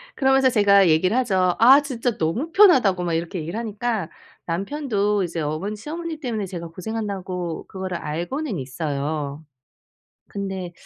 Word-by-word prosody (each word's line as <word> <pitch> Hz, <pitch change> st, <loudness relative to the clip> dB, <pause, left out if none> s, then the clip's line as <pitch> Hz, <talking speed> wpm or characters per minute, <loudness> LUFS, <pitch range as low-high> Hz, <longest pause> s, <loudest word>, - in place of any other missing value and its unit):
그러면서 265 Hz, -1 st, +4 dB
제가 200 Hz, -4 st, +5 dB
얘기를 180 Hz, +7 st, +3 dB
하죠. 185 Hz, -7 st, +1 dB
"아 265 Hz, +5 st, +7 dB
진짜 245 Hz, -4 st, -2 dB
너무 205 Hz, -, -1 dB
편하다."고 260 Hz, -, +5 dB
막 170 Hz, -, -1 dB
이렇게 170 Hz, +2 st, -2 dB
얘기를 165 Hz, +6 st, -5 dB
하니까 220 Hz, -4 st, -2 dB, 0.4 s
남편도 205 Hz, -, -1 dB
이제 170 Hz, -1 st, -4 dB
어머니 155 Hz, +8 st, -3 dB
시어머니 320 Hz, +6 st, -6 dB
때문에 230 Hz, -8 st, -3 dB
제가 170 Hz, -2 st, -6 dB
고생한다고 185 Hz, -3 st, -5 dB
그거를 190 Hz, -2 st, -5 dB
알고는 185 Hz, -, -3 dB
있어요. 145 Hz, +2 st, -3 dB, 0.9 s
근데 190 Hz, -3 st, -5 dB
195 Hz, 350 characters per minute, -23 LUFS, 170-240 Hz, 0.9 s, 아